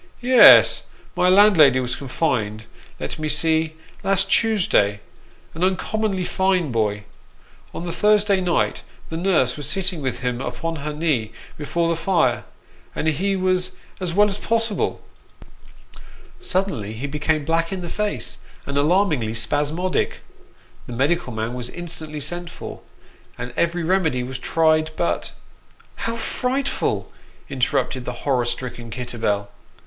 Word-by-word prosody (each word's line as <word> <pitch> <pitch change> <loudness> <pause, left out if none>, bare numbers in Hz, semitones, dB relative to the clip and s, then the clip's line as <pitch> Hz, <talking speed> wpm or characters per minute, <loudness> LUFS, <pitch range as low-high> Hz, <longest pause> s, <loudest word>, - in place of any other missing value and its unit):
" - - -31
Yes; 250 0 +8 0.3
my 180 - +3
landlady 185 -9 +6
was 125 -1 -2
confined 120 -6 -2 0.3
let - - -5
me 155 0 -2
see 160 +1 +1 0.3
last 195 0 +1
Tuesday: 175 - +3 0.5
an 165 - -3
uncommonly 190 +1 0
fine 185 -5 +1
boy. 105 -3 0 0.7
On 170 - -6
the 170 - -3
Thursday 210 0 +3
night 175 -2 0 0.3
the 160 - -5
nurse 165 -9 +2
was 145 -1 -3
sitting 185 -1 -1
with 130 -3 -3
him 125 -1 -2
upon 160 +7 -4
her 150 +1 -4
knee 150 -8 -1 0.2
before 165 +3 -1
the 170 - +1
fire, 170 +3 +1 0.5
and 155 - -2
he 195 +6 0
was 185 0 0 0.2
as 180 -2 -2
well 205 +4 +4
as 200 0 -4
possible. 225 -2 -1 1.4
Suddenly 185 - -2
he 115 +5 -5
became 150 +1 -1
black 165 +2 0
in 190 -1 -3
the 175 - -5
face, 210 +4 -3 0.3
and 140 0 -3
alarmingly 150 - +2
spasmodic. 150 +9 0 0.7
The 125 - -6
medical 140 +3 0
man 110 +1 -3
was 125 -1 -5
instantly 160 -3 -6
sent 175 +4 -5
for, - - -8 0.6
and 125 - -6
every 170 0 0
remedy 160 -7 +1
was 125 0 -5
tried, 155 +2 +2
but 170 - -2 0.3
" - - -31
How 230 - -2
frightful! 260 +4 -1 0.2
" - - -29
interrupted 130 -1 -1
the 125 -1 -7
horror 130 -4 +2
stricken 120 -1 -4
Kitterbell. 110 -4 -2
160 Hz, 140 wpm, -22 LUFS, 130-185 Hz, 1.4 s, Yes